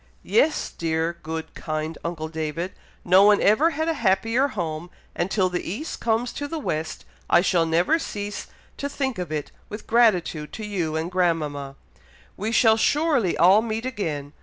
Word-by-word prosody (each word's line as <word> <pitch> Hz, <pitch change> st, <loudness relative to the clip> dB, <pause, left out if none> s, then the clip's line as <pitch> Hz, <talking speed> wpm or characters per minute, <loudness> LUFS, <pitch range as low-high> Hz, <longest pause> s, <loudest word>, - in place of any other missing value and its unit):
"Yes, 445 Hz, -9 st, +2 dB
dear, 165 Hz, +1 st, -2 dB
good, 160 Hz, 0 st, -5 dB
kind 155 Hz, 0 st, -4 dB
uncle 165 Hz, -2 st, -4 dB
David! 160 Hz, +3 st, -4 dB, 0.3 s
no 185 Hz, +2 st, +6 dB
one 205 Hz, 0 st, +6 dB
ever 245 Hz, +11 st, +4 dB
had 315 Hz, 0 st, -2 dB
a 330 Hz, -, +2 dB
happier 225 Hz, +2 st, +2 dB
home; 175 Hz, -, -4 dB, 0.3 s
and 175 Hz, -, -1 dB
till 190 Hz, -2 st, +2 dB
the 180 Hz, -1 st, -2 dB
east 230 Hz, -, -5 dB
comes 230 Hz, +1 st, 0 dB
to 290 Hz, -, -4 dB
the 325 Hz, -, -4 dB
west, 160 Hz, -, -3 dB, 0.2 s
I -, -, +6 dB
shall 175 Hz, -3 st, +2 dB
never 175 Hz, -, +2 dB
cease 205 Hz, -7 st, -5 dB, 0.3 s
to 280 Hz, -, -3 dB
think 265 Hz, -6 st, -2 dB
of 175 Hz, -4 st, -4 dB
it 150 Hz, -2 st, -3 dB, 0.2 s
with 210 Hz, +1 st, -7 dB
gratitude 180 Hz, -10 st, +2 dB
to 220 Hz, -, -5 dB
you 175 Hz, -7 st, -2 dB
and 160 Hz, +3 st, -2 dB
grandmama. 150 Hz, -6 st, -1 dB, 0.6 s
We 215 Hz, +3 st, -3 dB
shall 225 Hz, -1 st, +5 dB
surely 285 Hz, -, +2 dB
all 190 Hz, +5 st, +6 dB
meet 225 Hz, +1 st, -3 dB
again. 155 Hz, -, -4 dB
185 Hz, 170 wpm, -24 LUFS, 160-230 Hz, 0.6 s, no